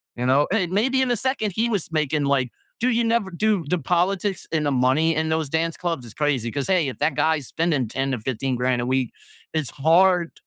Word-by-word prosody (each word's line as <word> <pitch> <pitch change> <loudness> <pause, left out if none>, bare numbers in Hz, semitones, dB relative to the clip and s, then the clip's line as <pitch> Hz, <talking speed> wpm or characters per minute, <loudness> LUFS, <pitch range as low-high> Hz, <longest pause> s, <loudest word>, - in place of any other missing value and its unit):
you 125 - -3
know? 135 +3 +3
And 185 -5 0
maybe 260 +7 +2
in 250 - 0
a 240 - +1
second, 250 -3 -1
he 230 +2 +1
was 200 -7 -2
making, 150 -2 0
like, 135 -3 +1 0.3
"Dude, 245 0 +1
you 235 - +2
never" 230 -3 +1
dude, 190 -4 0
the 180 - +2
politics 180 +5 0
and 155 -2 0
the 145 - +1
money 135 +6 +2
in 160 +1 0
those 160 -3 -1
dance 165 +1 -1
clubs 170 -7 -3
is 115 - -11
crazy, 140 -6 0
'cause, 140 +1 -3
hey, 180 -6 +2
if 130 - -8
that 155 - +1
guy's 155 -3 +1
spending 160 -7 0
10 135 +4 -2
to 125 - -2
15 130 +2 -2
grand 125 0 0
a - - -2
week, 130 -2 0 0.4
it's 155 -5 -1
hard 170 +4 +3
160 Hz, 230 wpm, -23 LUFS, 135-190 Hz, 0.4 s, know